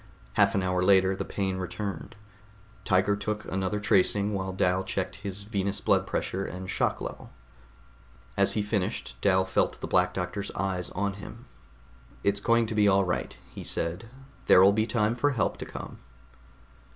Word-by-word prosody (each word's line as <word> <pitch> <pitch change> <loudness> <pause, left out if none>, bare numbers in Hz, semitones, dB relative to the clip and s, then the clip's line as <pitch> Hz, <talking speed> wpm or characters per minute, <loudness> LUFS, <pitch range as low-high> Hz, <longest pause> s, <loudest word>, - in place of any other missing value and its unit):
Half - - +3
an 95 - +1
hour 90 0 0
later 95 0 +4
the - - -3
pain 95 -2 -2
returned; 100 +5 -5 0.7
Tiger 95 +1 +2
took 105 +1 -3
another 95 +2 -2
tracing 100 0 +2
while 95 -1 -2
Dal 95 0 +1
checked 95 0 -3
his 100 0 -5
venous 100 -1 -2
pressure 95 +1 0
and 95 0 -6
shock - - 0
level. - - -7 1.1
As - - +3
he 105 - 0
finished, 100 - -2
Dal 95 -1 +3
felt 95 - 0
the - - -4
Black 90 0 +2
Doctor's 95 +2 -3
eyes 90 -1 -2
on 100 +1 -1
him. 115 +4 -10 0.8
"It's 100 0 +2
going 115 +2 +3
to 110 - -4
be 105 -1 +4
all 100 -1 +4
right," 65 -8 -3
he - - -8
said. 85 +7 -2 0.4
"There'll 95 +2 +7
be 110 +2 +1
time 110 -1 +1
for 145 +4 +1
help 120 - 0
to - - -7
come." - - -8
95 Hz, 165 wpm, -28 LUFS, 95-105 Hz, 1.1 s, There'll